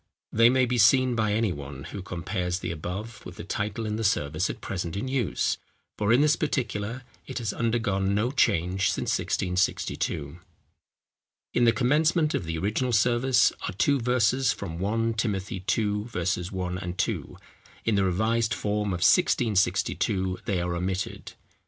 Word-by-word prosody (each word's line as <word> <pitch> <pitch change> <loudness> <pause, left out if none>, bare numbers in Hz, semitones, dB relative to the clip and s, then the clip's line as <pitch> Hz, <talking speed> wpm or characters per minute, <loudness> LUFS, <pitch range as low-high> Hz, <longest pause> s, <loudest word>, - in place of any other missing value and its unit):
They 115 +1 +6
may 130 0 +3
be 125 0 -1
seen 130 +3 +5
by 110 -2 +1
any 110 -3 +1
one, 70 -1 -8
who 100 - -5
compares 90 0 -3
the 95 - -4
above 95 +7 -6
with 90 - -9
the - - -8
title 105 +3 -3
in 105 0 -2
the 115 - -2
service 80 -5 0
at - - -5
present 90 -4 -4
in 105 +6 -3
use, 130 -6 0 0.4
for 105 +1 0
in 120 +4 +5
this 150 +1 +4
particular 125 -5 -2 0.2
it - - -5
has 115 -4 -2
undergone 100 -4 0
no 115 +5 +1
change 95 - +2
since - - -2
1662. 90 -4 -1 1.1
In 120 - +3
the 115 - +6
commencement 150 - +2
of 90 - -1
the 80 0 -3
original 110 +8 -1
service 120 +3 +3
are - - -4
two 140 +8 +2
verses 125 +2 +2
from 85 0 -5
1 115 +4 0
Timothy 100 -3 -2
ii. 105 -1 0
1, 90 -3 -3
2: - - -2 0.5
in 115 - +2
the 100 -1 +3
revised 110 +5 +1
form 105 0 -1
of 90 -2 -2
1662 95 -2 +2
they 95 -3 0
are 85 0 -2
omitted. 95 +2 -3
105 Hz, 160 wpm, -26 LUFS, 90-120 Hz, 1.1 s, They